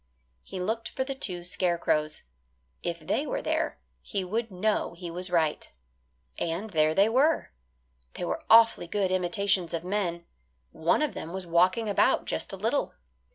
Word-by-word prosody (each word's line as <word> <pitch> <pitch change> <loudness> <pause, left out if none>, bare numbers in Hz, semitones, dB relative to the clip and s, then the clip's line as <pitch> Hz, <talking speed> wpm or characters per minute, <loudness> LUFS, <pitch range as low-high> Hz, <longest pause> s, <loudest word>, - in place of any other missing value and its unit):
He 190 - -8
looked 220 +5 -2
for 260 - -2
the 275 +1 -4
two 185 -10 -4
scarecrows. 170 -4 0 0.6
If 170 -1 -3
they 270 - -1
were - - -2
there - - -1 0.2
he 200 -3 -3
would 225 +5 -2
know 195 -1 -1
he 170 -1 -7
was 180 +2 -5
right. 160 -3 0 0.7
And 175 +6 -2
there 155 -2 +2
they 200 +2 +5
were. 275 +8 +2 0.6
They - - -5
were - - -3
awfully 225 -5 +6
good 195 0 0
imitations 185 -1 +1
of 165 - -4
men. 180 -3 -2 0.5
One 165 - +1
of 300 - -1
them 165 +2 -6
was 190 -1 -4
walking 180 +6 +3
about 205 - +3
just - - -3
a - - -6
little. - - -1
185 Hz, 160 wpm, -28 LUFS, 170-220 Hz, 0.7 s, awfully